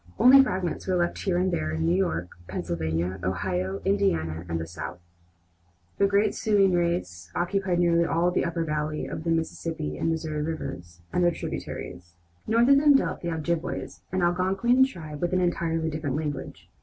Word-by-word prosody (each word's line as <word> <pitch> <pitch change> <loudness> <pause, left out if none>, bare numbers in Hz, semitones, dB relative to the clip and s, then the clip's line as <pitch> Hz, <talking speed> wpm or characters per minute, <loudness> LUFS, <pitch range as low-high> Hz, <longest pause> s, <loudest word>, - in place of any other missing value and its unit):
Only 270 +2 +8
fragments 185 - -2
were 185 - +1
left 175 -1 0
here 185 -4 0
and 185 +1 +1
there, 80 - -1
in 80 0 -1
New 85 - +3
York, 90 -2 0 0.2
Pennsylvania, 85 +2 -2
Ohio, 95 +1 -2
Indiana, 85 - 0
and 85 0 -1
the 80 - -4
South. 85 +1 -7 1.0
The 200 - +5
great 200 +1 +3
Siouan 200 -3 +3
race 170 - -1
occupied 185 0 0
nearly 170 -1 +3
all 170 +2 +1
the - - +1
upper 170 0 -1
valley 150 -1 -2
of - - -5
the - - 0
Mississippi 165 -1 -2
and - - 0
Missouri 155 -2 -2
rivers 90 - -5
and 180 - +2
their 175 - +5
tributaries. 85 - -6 0.3
North 230 +3 +4
of 275 - +7
them 290 0 +6
dwelt - - +1
the 170 - -3
Ojibways, 165 0 -3
an 185 0 0
Algonquin 190 +9 +3
tribe 155 - -8
with 175 +1 0
an 185 - +3
entirely 165 -2 0
different 150 -3 -3
language. 150 -3 -5
165 Hz, 175 wpm, -26 LUFS, -, 1.0 s, Only